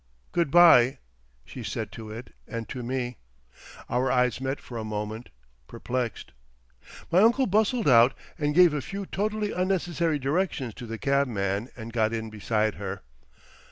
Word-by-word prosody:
"Good 170 -4 +1
bye!" 140 -6 +7 0.5
she 125 - -9
said 110 -2 -4
to 110 0 -9
it 115 +4 -9
and 115 -1 -5
to 130 - -5
me. 125 -1 -3 0.7
Our 125 +1 0
eyes 125 0 +1
met 135 +1 -2
for 120 -2 -8
a - - -4
moment—perplexed. 105 - -6 0.8
My 175 - +5
uncle 240 +5 +4
bustled 215 +2 +1
out 120 0 +6 0.2
and 150 -1 -1
gave 175 -3 +6
a 150 - -1
few 195 +10 -6
totally 210 +2 -2
unnecessary 175 -4 0
directions 140 - -1
to 120 - -9
the 115 0 -5
cabman 115 -6 0
and 115 0 -8
got 110 -1 +1
in 110 -1 -4
beside 110 0 0
her. 95 0 -5
125 Hz, 150 wpm, -26 LUFS, 110-170 Hz, 0.8 s, bye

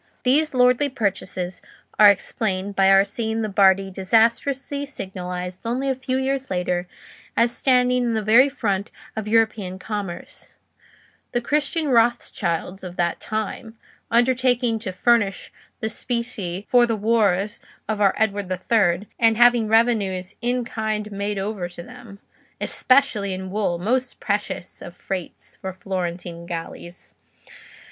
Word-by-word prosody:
These 285 +3 +2
lordly 250 +3 +4
purchases 190 -6 -3 0.4
are 210 -1 +10
explained 200 -1 -1
by 195 -1 +4
our 195 0 +6
seeing 225 0 -2
the 215 - -2
Bardi 195 -1 +4
disastrously 235 +8 +1
signalised 180 -8 -6
only 250 +4 -1
a - - -1
few 260 0 -2
years 265 0 -1
later 180 -1 -1 0.5
as 235 +1 +3
standing 250 -1 +3
in 240 -1 0
the 220 - -1
very 235 +6 +6
front 205 -8 -2 0.3
of 220 -1 -4
European 215 -4 +1
commerce—the 205 +4 -8
Christian 300 +4 0
Rothschilds 205 -7 0
of 180 -1 -7
that 170 -1 -1
time—undertaking 235 +2 -1
to 215 -4 -4
furnish 205 0 +1 0.3
specie 220 -4 -2
for 245 -1 +5
the 230 - 0
wars 210 -2 +1 0.3
of 215 -1 -2
our 200 -2 +4
Edward 205 -3 0
the 185 - -1
Third, 185 -2 +1
and 225 -1 +4
having 240 -2 +5
revenues 210 -5 +1
"in 245 0 0
kind" 215 -2 -3
made 200 +1 -3
over 195 -2 -3
to 175 -1 -10
them; 245 -2 -12 0.4
especially 220 -8 +2
in 190 0 -7
wool, 200 -4 0
most 250 +8 -1
precious 205 -3 -3
of 175 - -9
freights 185 -3 -7
for 190 - -4
Florentine 175 -2 -5
galleys. 170 +1 -8
215 Hz, 130 wpm, -22 LUFS, 190-240 Hz, 0.5 s, are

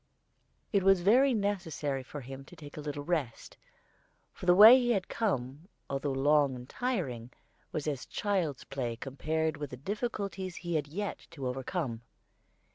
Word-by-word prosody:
It 200 - +4
was 195 -1 +5
very 250 +9 +5
necessary 185 - -1
for 140 +3 -8
him 135 +2 -8
to 175 - -14
take 145 -3 -11
a 150 - -6
little 145 -1 -4
rest; 145 -7 -3 0.8
for 180 - -9
the 175 - +7
way 220 +6 +10
he 240 -1 +2
had 190 -4 -1
come, 145 - -2 0.2
although 140 +1 -1
long 140 0 +3
and 125 0 -9
tiring, 145 - -3 0.4
was 155 0 -3
as 140 -4 -3
child's 185 -9 -1
play 125 -4 -3
compared 155 +5 -2
with 145 -1 -5
the 125 - -8
difficulties 200 - -4
he 175 -1 -4
had 150 -3 0
yet 200 +7 -5
to 140 -6 -7
overcome. 130 -1 -3
155 Hz, 160 wpm, -31 LUFS, 135-195 Hz, 0.8 s, way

